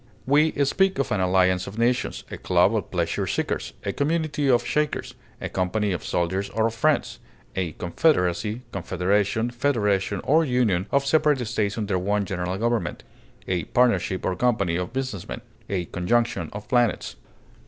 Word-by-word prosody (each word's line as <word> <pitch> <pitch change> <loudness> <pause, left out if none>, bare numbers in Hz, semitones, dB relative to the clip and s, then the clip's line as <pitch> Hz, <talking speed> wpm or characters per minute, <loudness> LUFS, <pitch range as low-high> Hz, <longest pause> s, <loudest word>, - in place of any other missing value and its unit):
We 150 +4 +4
speak 190 +7 +2
of 135 - -1
an 100 - +1
alliance 90 0 +2
of 100 +3 -8
nations, 120 +2 0
a - - -5
club - - +3
of - - -2
pleasure - - -1
seekers, - - -2
a - - -1
community 150 -1 0
of 120 -1 +3
Shakers, 150 0 -1 0.3
a - - -3
company 100 +3 -1
of 90 - -3
soldiers 95 +3 -1
or 110 +1 0
of 115 - 0
friends, 150 +6 +1 0.4
a 90 -4 -2
confederacy, 105 - +1
confederation, 100 +5 0
federation, 105 -7 0
or 160 +3 +4
union 120 - +1
of 140 0 +2
separate 150 -3 +2
states 105 -2 -1
under 100 -4 0
one 100 +2 0
general 90 0 -3
government, 115 +2 -1 0.4
a 90 -3 -1
partnership 120 -6 +1
or 95 - 0
company 100 -5 +1
of 90 0 -2
business 130 -7 -4
men, - - -6 0.3
a 90 -3 -1
conjunction 120 +8 0
of 105 +1 -8
planets. 120 -3 +1
110 Hz, 160 wpm, -24 LUFS, 95-125 Hz, 0.4 s, We